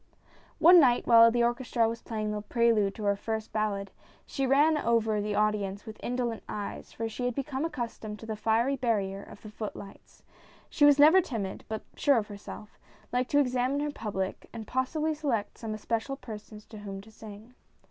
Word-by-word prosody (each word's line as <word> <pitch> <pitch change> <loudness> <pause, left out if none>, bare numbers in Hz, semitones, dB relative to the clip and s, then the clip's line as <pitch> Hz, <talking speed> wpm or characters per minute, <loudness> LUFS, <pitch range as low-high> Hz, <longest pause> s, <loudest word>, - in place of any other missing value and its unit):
O 340 - +7
NE 360 - +10
night, 250 -5 +4
while 230 -1 +8
the 240 +1 +1
orchestra 240 -1 +1
was 230 +1 -4
playing 215 -2 -3
the 210 0 -3
prelude 215 -2 +2
to 215 - -7
her 200 0 +2
first 220 +1 -4
ballad, 200 -2 -1 0.3
she 270 -1 -2
ran 295 +4 +4
over 225 -6 +1
the 210 0 -2
audi 210 -1 +2
ence 195 +1 -6
with 220 -1 -9
indolent 240 -2 -2
eyes, 205 -1 -6
for 225 - -4
she 225 +3 -4
had 245 -1 -1
become 275 +1 -2
accustomed 235 -8 -5
to 225 - -11
the 220 -1 -4
fiery 225 +5 +1
barrier 205 -6 -1
of - - -14
the 215 - -9
foot 215 -1 -6
lights. 195 -1 -13 0.5
She 290 - +4
was 290 -1 +7
never 310 +6 +7
timid, 205 - -5
but 220 -1 -4
sure 285 -3 +3
of 215 -2 -2
herself, 205 +1 -10 0.3
liked 250 0 0
to 290 - +3
examine 255 +1 +1
her 295 0 -2
public 195 -7 -4
and 225 -2 -7
possibly 300 +7 -1
select 265 -9 -2
some 220 -2 -4
especial 230 +5 -2
persons 215 -4 -10
to 215 - -10
whom 200 -1 -7
to 220 +2 -16
sing. 220 +2 -12
225 Hz, 200 wpm, -29 LUFS, 210-255 Hz, 0.5 s, NE